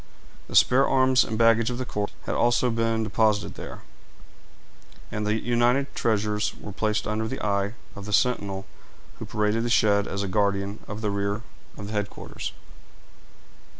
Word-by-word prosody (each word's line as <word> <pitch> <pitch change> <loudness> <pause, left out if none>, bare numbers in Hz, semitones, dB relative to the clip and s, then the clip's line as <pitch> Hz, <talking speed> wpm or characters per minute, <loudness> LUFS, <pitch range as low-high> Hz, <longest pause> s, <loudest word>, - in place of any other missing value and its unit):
The - - -7
spare 135 +2 +5
arms 130 -1 +4
and 110 - -4
baggage 115 0 +4
of 120 - -3
the 130 - -3
corps 105 -3 -2 0.2
had - - -2
also 120 +1 +2
been 115 0 0
deposited 105 -1 +1
here; - - -9 1.3
and 105 0 -2
the 110 +1 +1
united 120 +4 +1
treasures 105 -1 0
were 105 - -8
placed 105 +2 -1
under 110 +1 -1
the 130 - -4
eye 100 +1 0 0.2
of 100 -1 -8
the 105 - -6
sentinel 100 -4 +1 0.5
who - - -5
paraded 105 +2 0
the 120 - -1
shed 100 -3 +3
as 100 +1 -2
a - - -2
guardian 100 0 0
of 105 +1 -6
the 105 -2 -1
rear 100 +2 -2 0.3
of 100 - -7
the 105 - -7
headquarters. 105 -1 -4
110 Hz, 165 wpm, -25 LUFS, 100-115 Hz, 1.3 s, spare